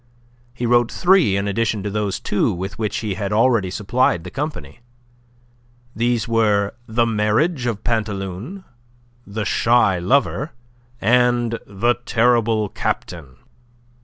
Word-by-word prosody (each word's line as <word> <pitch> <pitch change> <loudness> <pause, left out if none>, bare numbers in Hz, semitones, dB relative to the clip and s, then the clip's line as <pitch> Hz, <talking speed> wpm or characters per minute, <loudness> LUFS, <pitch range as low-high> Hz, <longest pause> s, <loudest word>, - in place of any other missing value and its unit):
He 120 - -3
wrote 120 0 +3
three 175 - +3
in 100 +1 -1
addition 110 0 -1
to 105 - -2
those 105 -2 -2
two 105 - 0
with 95 +3 -6
which 110 -2 -2
he 105 -3 -2
had 100 0 -4
already 110 -3 +2
supplied 105 -2 0
the 90 - -8
company; 150 -2 -5 1.2
these 120 -1 0
were 105 -3 +1
"The 115 +1 +1
Marriage 115 +7 +1
of 110 -3 -3
Pantaloon," 110 - -3 0.6
"The 105 +1 -4
Shy 110 -6 +3
Lover," 135 - 0 0.5
and 120 0 +2
"The 120 +5 0
Terrible 115 -3 +2
Captain." 75 -10 -4
110 Hz, 125 wpm, -20 LUFS, 100-120 Hz, 1.2 s, wrote